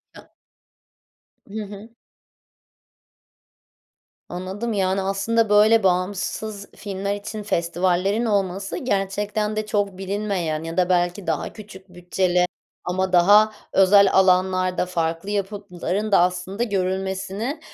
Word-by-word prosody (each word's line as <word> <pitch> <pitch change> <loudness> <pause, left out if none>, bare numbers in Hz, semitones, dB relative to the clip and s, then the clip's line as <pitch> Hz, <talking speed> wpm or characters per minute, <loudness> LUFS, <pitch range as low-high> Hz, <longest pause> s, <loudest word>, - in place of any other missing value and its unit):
Ya - - -16 1.2
Hı 215 +1 -5
hı. 205 +2 -10 2.4
Anladım, 190 +6 -4
yani, 190 -1 0
aslında, 205 +3 0
böyle, 215 +1 +5
bağımsız 200 +3 -1
filmler 200 0 -3
için 210 +1 -7
festivallerin 185 +4 0
olması 195 -2 -1
gerçekten 205 -1 -1
de 215 0 -2
çok 205 -3 -1
bilinmeyen 190 -5 -2
ya 165 +1 -6
da 180 -1 +2
belki 175 +1 0
daha 160 -3 -2
küçük 195 -3 -13
bütçeli 180 0 0 0.4
ama 185 +1 -1
daha 205 +5 +6 0.2
özel 195 +1 +6
alanlarda 185 -1 +3
farklı 165 +1 -2
yapıtların 205 0 -3
da - - +6
aslında 180 +4 0
görülmesini, 190 - -2
195 Hz, 105 wpm, -22 LUFS, 180-205 Hz, 2.4 s, daha